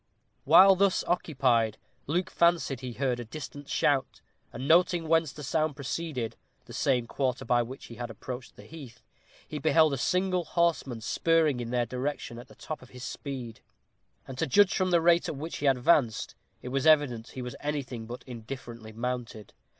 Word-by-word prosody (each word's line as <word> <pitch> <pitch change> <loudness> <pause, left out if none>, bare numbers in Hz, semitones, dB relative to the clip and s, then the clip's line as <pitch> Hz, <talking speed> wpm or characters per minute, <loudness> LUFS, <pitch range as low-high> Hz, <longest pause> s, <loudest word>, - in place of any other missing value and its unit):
While 195 +1 +8
thus 195 0 +2
occupied, 130 -10 +1 0.3
Luke 175 +5 -1
fancied 170 -6 +2
he 125 -1 -6
heard 125 -1 -1
a - - -4
distant 145 +3 -9
shout, 135 -2 +1 0.3
and 130 +3 -6
noting 170 0 +4
whence 160 -2 +2
the 150 - -10
sound 155 +1 0
proceeded 140 -3 -4 0.3
the - - -12
same 125 -3 +1
quarter 130 +1 -2
by 120 -1 +3
which 125 +3 -7
he 115 - -11
had 120 0 -5
approached 125 +3 -8
the - - -14
heath 145 -7 -12 0.4
he 150 - -5
beheld 155 0 +4
a 135 - -2
single 180 +3 +1
horseman 160 -8 0
spurring 155 +3 +2
in 120 -1 -4
their 120 0 +1
direction 125 0 -4
at 120 - -11
the - - -17
top 155 - -7
of 130 - -15
his 125 -1 -11
speed; 125 -2 -6 0.7
and 130 -1 -8
to 160 - +1
judge 200 +7 +5
from 185 -1 +1
the 170 -2 +3
rate 170 +1 +4
at - - -4
which 155 +4 -5
he 145 - -1
advanced, 125 -3 +2 0.3
it 125 - -5
was 135 +3 0
evident 140 -7 +3
he 130 - -3
was 125 +2 -6
anything 135 -6 -4
but 120 +2 -8
indifferently 115 -2 -8
mounted. 115 -2 -5
135 Hz, 180 wpm, -28 LUFS, 120-160 Hz, 0.7 s, While